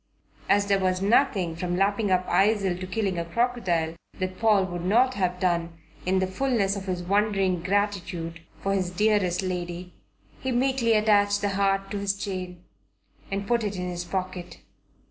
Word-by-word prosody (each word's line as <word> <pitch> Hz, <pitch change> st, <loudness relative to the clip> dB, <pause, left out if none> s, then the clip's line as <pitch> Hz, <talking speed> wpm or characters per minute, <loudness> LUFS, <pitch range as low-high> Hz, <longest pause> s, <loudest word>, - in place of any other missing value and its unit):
As 200 Hz, 0 st, +4 dB
there 200 Hz, -1 st, +2 dB
was 185 Hz, -1 st, +1 dB
nothing, 195 Hz, -5 st, +2 dB
from 175 Hz, +1 st, -2 dB
lapping 200 Hz, +2 st, +1 dB
up 185 Hz, -1 st, +2 dB
Eisel 195 Hz, 0 st, +2 dB
to 185 Hz, -, -5 dB
killing 190 Hz, -2 st, -1 dB
a 170 Hz, -, -2 dB
crocodile, 175 Hz, -5 st, 0 dB, 0.2 s
that 185 Hz, -1 st, -4 dB
Paul 215 Hz, -4 st, +4 dB
would 175 Hz, -2 st, -5 dB
not 240 Hz, +8 st, +3 dB
have 180 Hz, -4 st, -1 dB
done, 170 Hz, -2 st, 0 dB, 0.3 s
in 190 Hz, +1 st, +3 dB
the 190 Hz, -, +2 dB
fulness 200 Hz, -1 st, 0 dB
of 195 Hz, -1 st, -6 dB
his 180 Hz, -1 st, -2 dB
wondering 195 Hz, -2 st, +1 dB
gratitude, 180 Hz, -3 st, -2 dB, 0.2 s
for 195 Hz, +3 st, 0 dB
his 185 Hz, -2 st, 0 dB
dearest 195 Hz, -1 st, +1 dB
lady, 180 Hz, -1 st, -4 dB, 0.5 s
he 260 Hz, -, -2 dB
meekly 250 Hz, -2 st, +2 dB
attached 205 Hz, -1 st, +3 dB
the 205 Hz, -, +1 dB
heart 195 Hz, 0 st, 0 dB
to 205 Hz, -, -2 dB
his 200 Hz, 0 st, -1 dB
chain 185 Hz, -3 st, -5 dB, 0.7 s
and 195 Hz, +1 st, -3 dB
put 235 Hz, -1 st, +1 dB
it 205 Hz, -1 st, -2 dB
in 180 Hz, -1 st, -3 dB
his 175 Hz, 0 st, -4 dB
pocket. 180 Hz, -1 st, -5 dB
195 Hz, 170 wpm, -26 LUFS, 180-205 Hz, 0.7 s, As